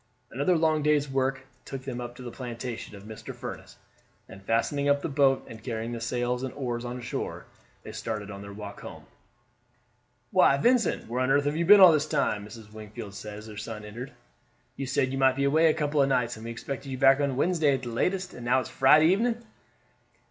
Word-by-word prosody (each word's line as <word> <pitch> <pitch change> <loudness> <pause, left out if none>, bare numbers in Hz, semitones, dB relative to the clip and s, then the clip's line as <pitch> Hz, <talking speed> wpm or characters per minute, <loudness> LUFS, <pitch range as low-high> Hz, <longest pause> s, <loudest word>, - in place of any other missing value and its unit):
Another 145 +8 +2
long 155 -1 +2
day's 150 -1 +2
work 135 0 -1 0.2
took 135 -1 -7
them 125 -2 -5
up 120 0 -7
to 125 - -10
the 120 - -6
plantation 120 -3 -6
of 100 - -12
Mr. 110 +1 -9
Furniss, - - -8 0.5
and 95 - -12
fastening 130 +7 0
up 140 0 +2
the - - 0
boat, 135 -2 +2
and 110 -1 -10
carrying 115 -1 -4
the 120 -1 -5
sails 120 +1 -1
and 130 -1 -3
oars 120 -4 -3
on 125 +1 -5
shore, 125 - -5 0.4
they - - -8
started 105 -2 -5
on 100 -1 -8
their 100 0 -9
walk 105 +1 -8
home. - - -10 1.3
"Why, 140 - +5
Vincent, 240 - +2
where 125 +3 -2
on 130 - +1
earth 140 +1 +3
have 145 +1 0
you 170 +1 0
been 205 +1 +9
all 185 -2 +10
this 155 -1 +1
time?" 110 -9 0
Mrs. 110 -1 -12
Wingfield 110 -1 -9
said 105 +1 -8
as 105 - -10
her 110 -1 -10
son 105 0 -6
entered. 120 +5 -8 0.6
"You 135 - -4
said 130 0 +1
you 135 - -2
might 130 -1 +4
be 140 - -1
away 155 +4 +4
a 155 - +3
couple 150 -2 +1
of 135 - +3
nights; 125 -2 +1
and 110 +1 -10
we - - -5
expected 135 +4 -6
you 130 - -4
back 135 +1 +5
on 140 -3 0
Wednesday 155 -3 +2
at 130 - -6
the 120 - -4
latest, 180 +10 -1
and 125 - -9
now 125 +2 +3
it 130 - +1
is - - -9
Friday 150 +4 +5
evening." 230 +7 +2
130 Hz, 225 wpm, -27 LUFS, 115-145 Hz, 1.3 s, all